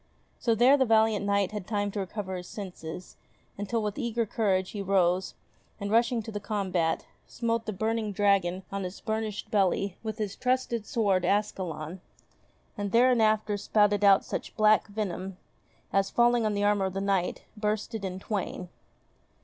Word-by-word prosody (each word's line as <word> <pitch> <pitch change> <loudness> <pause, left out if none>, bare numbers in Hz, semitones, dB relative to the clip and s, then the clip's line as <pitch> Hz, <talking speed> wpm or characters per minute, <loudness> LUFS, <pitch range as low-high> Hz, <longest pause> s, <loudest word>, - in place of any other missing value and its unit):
So 230 -2 +2
there 250 +5 +6
the 265 - +3
valiant 220 -2 +3
knight 200 -1 +2
had 210 -4 -6
time 205 -2 -1
to 205 - -4
recover 190 0 -4
his 180 0 -7
senses, 180 -4 -8 0.4
until 210 +3 -2
with 210 +4 -3
eager 235 -2 0
courage 195 -4 0
he 205 - -4
rose, 185 -1 +1 0.4
and 200 0 -3
rushing 235 0 +2
to 220 - -7
the 205 - -4
combat, 190 -6 -1 0.2
smote 230 -1 -2
the - - 0
burning 220 +2 -1
dragon 195 -2 +2
on 200 0 -3
his 180 +1 -6
burnished 220 -1 -3
belly 195 -2 +1
with 220 -2 -4
his 205 -3 -3
trusty 255 -2 0
sword 205 -5 +1
Ascalon; 185 -5 -2 0.7
and 205 -1 -3
thereinafter 220 -4 +3
spouted 205 0 +2
out 200 -1 +6
such - - -5
black 215 0 +4
venom, 195 -3 -4 0.6
as, 195 0 +2
falling 240 -1 +3
on 210 - -1
the 205 - 0
armour 205 -1 +2
of 190 - -3
the 195 - -2
Knight, 195 -3 0
burst 210 +1 -2
it 220 -3 -4
in 185 -1 -3
twain. 190 -3 -4
205 Hz, 165 wpm, -28 LUFS, 190-220 Hz, 0.7 s, there